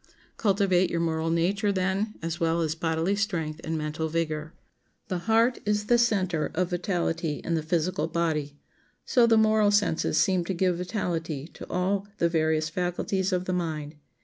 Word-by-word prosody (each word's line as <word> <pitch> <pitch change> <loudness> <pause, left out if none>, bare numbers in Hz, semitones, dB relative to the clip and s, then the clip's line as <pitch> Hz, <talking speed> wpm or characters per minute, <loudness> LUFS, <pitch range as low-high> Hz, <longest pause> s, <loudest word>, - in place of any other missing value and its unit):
Cultivate 190 -4 +2
your 170 - -1
moral 165 -1 0
nature, 195 +5 +1
then, 195 +3 -1
as 165 0 -3
well 165 0 +1
as 160 -2 0
bodily 165 +3 0
strength 175 -7 -2
and 160 0 -2
mental 155 +1 -2
vigor. 155 -1 -2 0.6
The 185 - -1
heart 230 +3 +4
is 210 0 0
the 240 +2 +4
center 185 -9 +1
of 180 +1 0
vitality 170 -3 -1
in 170 - -2
the 160 - +1
physical 160 +1 0
body; 155 -4 -1 0.5
so 245 -3 +4
the 225 -1 +5
moral 215 -1 +4
senses 205 -5 +1
seem 185 -2 +3
to 190 - -2
give 180 -1 +1
vitality 170 -6 -3
to - - -11
all 195 +2 0
the 170 - +2
various 160 -1 +1
faculties 180 +3 -1
of 180 0 0
the 185 - -1
mind. 160 -4 -3
175 Hz, 170 wpm, -27 LUFS, 160-195 Hz, 0.6 s, the